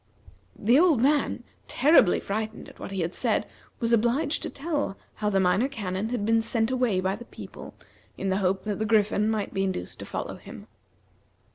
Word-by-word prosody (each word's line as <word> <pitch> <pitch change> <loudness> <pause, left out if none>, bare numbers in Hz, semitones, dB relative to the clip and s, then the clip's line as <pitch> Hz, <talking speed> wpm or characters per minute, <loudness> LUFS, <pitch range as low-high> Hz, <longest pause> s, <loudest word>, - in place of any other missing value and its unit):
The 235 +7 +4
old 330 -7 +5
man, 285 +4 +2 0.2
terribly 270 - +5
frightened 215 +2 -4
at - - -15
what - - -6
he 195 -2 -3
had 170 +2 -2
said, - - 0 0.3
was 235 -1 +1
obliged 255 +7 +2
to - - -3
tell 290 -8 -2 0.2
how 210 - 0
the 195 -2 +2
Minor 190 +7 +3
Canon 205 -5 -3
had 235 -4 -2
been 225 +1 +3
sent 225 +1 0
away 250 -7 +1
by 190 +1 0
the 240 +3 -10
people, - - -10 0.4
in 195 - -2
the 190 - +1
hope 190 -1 0
that 210 -2 -3
the 220 - 0
Griffin 210 -1 +2
might 215 -2 -2
be 195 - 0
induced 185 - -3
to - - -6
follow - - -5
him. - - -11
220 Hz, 190 wpm, -26 LUFS, 195-245 Hz, 0.4 s, old